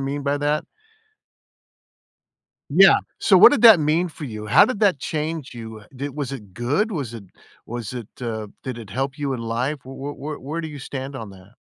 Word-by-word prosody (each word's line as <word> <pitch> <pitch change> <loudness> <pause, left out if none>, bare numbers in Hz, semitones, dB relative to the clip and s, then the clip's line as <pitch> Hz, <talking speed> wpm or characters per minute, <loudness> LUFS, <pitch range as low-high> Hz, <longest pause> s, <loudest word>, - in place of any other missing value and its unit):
mean 140 +1 -3
by 140 +1 0
that? 145 +1 0 2.1
Yeah. - - +7 0.2
So, - - +5
what - - +9
did 285 - 0
that 220 -9 +9
mean 160 +4 +2
for 155 -2 -10
you? 110 -5 -6
How - - +7
did 250 -5 -3
that 200 -8 +3
change 155 -2 -4
you? 110 -2 -9
Did 140 +1 -6
was 140 -3 -3
it 105 -8 -9
good? 145 - 0
Was 140 - -4
it 110 -4 -9 0.4
was 120 -2 -6
it, 120 -4 -6
uh, 110 -3 -4 0.2
did 130 -3 -5
it 110 -4 -10
help 135 +6 -3
you 140 -2 -2
in 125 - -4
life? 125 +6 -2
Wh 130 - -14
wh 140 +2 -6
wh 150 +1 -7
where 155 +5 -4
do 160 - -5
you 145 -2 -9
stand 135 0 -6
on 110 -5 -7
that? 95 +4 -17
135 Hz, 205 wpm, -22 LUFS, 115-150 Hz, 2.1 s, what